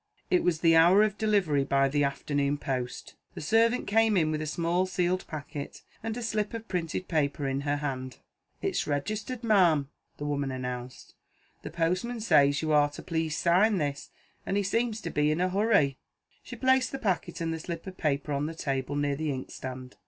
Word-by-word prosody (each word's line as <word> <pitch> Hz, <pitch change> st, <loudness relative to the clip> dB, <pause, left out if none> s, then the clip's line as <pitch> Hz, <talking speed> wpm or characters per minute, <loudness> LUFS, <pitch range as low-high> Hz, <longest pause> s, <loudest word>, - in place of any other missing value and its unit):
It 365 Hz, -, +3 dB
was 170 Hz, -2 st, +1 dB
the 165 Hz, -1 st, +5 dB
hour 175 Hz, +6 st, +7 dB
of 210 Hz, -1 st, -1 dB
delivery 195 Hz, -10 st, +2 dB
by 135 Hz, 0 st, +2 dB
the 145 Hz, +1 st, +1 dB
afternoon 140 Hz, +1 st, 0 dB
post. 130 Hz, -3 st, -4 dB, 0.2 s
The -, -, -6 dB
servant 225 Hz, +8 st, +2 dB
came 220 Hz, -1 st, +3 dB
in 155 Hz, -3 st, +2 dB
with 155 Hz, 0 st, -2 dB
a 155 Hz, -, -3 dB
small 170 Hz, +4 st, 0 dB
sealed 180 Hz, 0 st, 0 dB
packet, 145 Hz, -1 st, -7 dB, 0.2 s
and 225 Hz, +1 st, -4 dB
a 245 Hz, -, -4 dB
slip 215 Hz, -1 st, -1 dB
of 225 Hz, 0 st, -7 dB
printed 180 Hz, 0 st, -3 dB
paper 145 Hz, -3 st, 0 dB
in 135 Hz, +1 st, -1 dB
her 145 Hz, 0 st, 0 dB
hand. 130 Hz, -4 st, -4 dB, 0.5 s
"It's -, -, -1 dB
registered, 210 Hz, -, -3 dB
ma'am," 175 Hz, -10 st, +3 dB, 0.3 s
the 145 Hz, -, -5 dB
woman 140 Hz, -1 st, -1 dB
announced. 125 Hz, -1 st, -6 dB, 0.5 s
"The -, -, -6 dB
postman 180 Hz, +9 st, -1 dB
says 145 Hz, -9 st, +3 dB
you 155 Hz, -, 0 dB
are 145 Hz, -1 st, +4 dB
to 145 Hz, -, -10 dB
please 160 Hz, -2 st, -2 dB
sign 190 Hz, +5 st, +3 dB
this. 145 Hz, -3 st, -3 dB, 0.3 s
And 195 Hz, -, -1 dB
he 205 Hz, -, +1 dB
seems 225 Hz, +2 st, 0 dB
to -, -, -5 dB
be 150 Hz, 0 st, +2 dB
in 155 Hz, +2 st, 0 dB
a 185 Hz, +1 st, +2 dB
hurry." 195 Hz, -, +2 dB, 0.4 s
She -, -, -9 dB
placed 260 Hz, 0 st, +2 dB
the 270 Hz, -, -3 dB
packet 195 Hz, -9 st, -2 dB
and 165 Hz, -1 st, -1 dB
the 160 Hz, -, -4 dB
slip 165 Hz, 0 st, -6 dB
of 190 Hz, -1 st, -8 dB
paper 145 Hz, -1 st, -1 dB
on 140 Hz, +2 st, -1 dB
the 165 Hz, -, -6 dB
table, 135 Hz, -2 st, -2 dB
near 145 Hz, -1 st, 0 dB
the 155 Hz, +1 st, -2 dB
inkstand. 130 Hz, -1 st, -7 dB
160 Hz, 195 wpm, -28 LUFS, 145-200 Hz, 0.5 s, hour